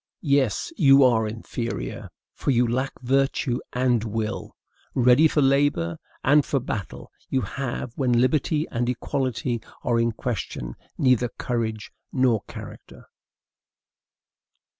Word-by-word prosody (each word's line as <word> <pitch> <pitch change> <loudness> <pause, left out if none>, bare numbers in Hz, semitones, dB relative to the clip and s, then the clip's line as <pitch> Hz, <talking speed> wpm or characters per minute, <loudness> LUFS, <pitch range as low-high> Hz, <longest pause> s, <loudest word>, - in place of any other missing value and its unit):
Yes, 140 - +1
you 140 -5 +7
are 115 -4 +4
inferior, 115 - -5 0.2
for - - -3
you 125 -2 +3
lack 130 +3 -2
virtue 130 0 +1
and 125 -3 +1
will! 110 -1 -4 0.4
Ready 125 +5 +6
for 150 -2 +2
labor 135 - +2 0.2
and 145 +2 +5
for 140 - 0
battle, 110 -6 -6 0.2
you 130 - +1
have, 120 +2 -4
when 130 -3 +1
liberty 150 +4 +1
and 120 0 -1
equality 125 -2 -2 0.2
are 120 -1 +1
in 115 0 +1
question, 100 - -4 0.2
neither 125 -2 +3
courage 110 -3 -3 0.2
nor 125 -5 +2
character! - - -11
125 Hz, 120 wpm, -24 LUFS, 115-135 Hz, 0.4 s, you